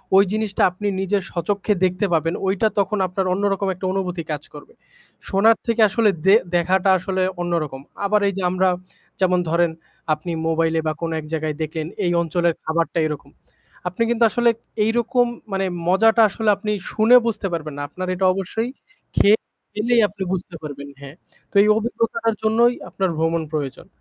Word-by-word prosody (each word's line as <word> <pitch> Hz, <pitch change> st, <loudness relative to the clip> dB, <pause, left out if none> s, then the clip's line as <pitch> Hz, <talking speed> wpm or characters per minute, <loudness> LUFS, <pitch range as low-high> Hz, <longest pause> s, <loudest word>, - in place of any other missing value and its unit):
ওই 195 Hz, -, +8 dB
জিনিসটা 215 Hz, -2 st, -1 dB
আপনি 205 Hz, +3 st, -4 dB
নিজের 195 Hz, +1 st, 0 dB
স্বচক্ষে 200 Hz, +4 st, 0 dB
দেখতে 185 Hz, +2 st, 0 dB
পাবেন, 165 Hz, +1 st, +1 dB
ওইটা 200 Hz, +3 st, +2 dB
তখন 210 Hz, +2 st, 0 dB
আপনার 185 Hz, +1 st, -2 dB
অন্যরকম 200 Hz, 0 st, 0 dB
একটা 185 Hz, +1 st, -7 dB
অনুভূতি 180 Hz, -3 st, -2 dB
কাজ 150 Hz, -1 st, -3 dB
করবে। 145 Hz, -, -12 dB, 0.6 s
শোনার 220 Hz, +4 st, +4 dB
থেকে 230 Hz, -1 st, +1 dB
আসলে 220 Hz, +1 st, +3 dB, 0.2 s
দে 195 Hz, +2 st, +7 dB, 0.2 s
দেখাটা 185 Hz, +3 st, +2 dB
আসলে 190 Hz, +1 st, -2 dB, 0.2 s
অন্যরকম। 165 Hz, -6 st, -2 dB, 0.2 s
আবার 210 Hz, +1 st, +2 dB
এই 200 Hz, -, 0 dB
যে, -, -, -2 dB
আমরা 185 Hz, +1 st, +2 dB, 0.5 s
যেমন 180 Hz, -1 st, +3 dB
ধরেন, 170 Hz, 0 st, +2 dB, 0.4 s
আপনি 155 Hz, +3 st, -5 dB, 0.2 s
মোবাইলে 165 Hz, 0 st, +1 dB
বা 155 Hz, -, +1 dB
কোনো 165 Hz, -1 st, -2 dB
এক 155 Hz, -, -8 dB
জায়গায় 155 Hz, -1 st, -2 dB
দেখলেন, 155 Hz, 0 st, -3 dB, 0.2 s
এই 175 Hz, -, +1 dB
অঞ্চলের 170 Hz, +1 st, +1 dB
খাবারটা 165 Hz, +1 st, -1 dB
এরকম। 150 Hz, -3 st, -6 dB, 0.6 s
আপনি 180 Hz, +5 st, -5 dB
কিন্তু 235 Hz, 0 st, +2 dB
আসলে, 240 Hz, 0 st, +3 dB, 0.4 s
এইরকম 240 Hz, +2 st, +2 dB, 0.3 s
মানে 195 Hz, 0 st, 0 dB, 0.2 s
মজাটা 225 Hz, +5 st, +4 dB
আসলে 220 Hz, +2 st, -1 dB
আপনি 210 Hz, +1 st, -3 dB, 0.2 s
শুনে 225 Hz, +3 st, +5 dB
বুঝতে 220 Hz, -3 st, -1 dB
পারবেন 155 Hz, -3 st, -4 dB
না। -, -, -4 dB
আপনার 185 Hz, +4 st, -5 dB
এটা 190 Hz, +1 st, 0 dB
অবশ্যই 200 Hz, +5 st, -3 dB, 0.5 s
খেয়ে 210 Hz, +2 st, +6 dB, 0.4 s
খেলেই 235 Hz, +2 st, +2 dB
আপনি 195 Hz, -1 st, -6 dB
বুঝতে 180 Hz, -1 st, -4 dB
পারবেন, 140 Hz, -1 st, -7 dB
হ্যাঁ। 140 Hz, +1 st, -10 dB, 0.4 s
তো, -, -, -28 dB
এই -, -, +2 dB
অভিজ্ঞতাটার 230 Hz, 0 st, -1 dB
জন্যই 230 Hz, +3 st, +4 dB, 0.2 s
আপনার 190 Hz, -1 st, -1 dB
ভ্রমণ 165 Hz, +1 st, 0 dB
প্রয়োজন। 145 Hz, -4 st, -4 dB
190 Hz, 165 wpm, -21 LUFS, 165-215 Hz, 0.6 s, ওই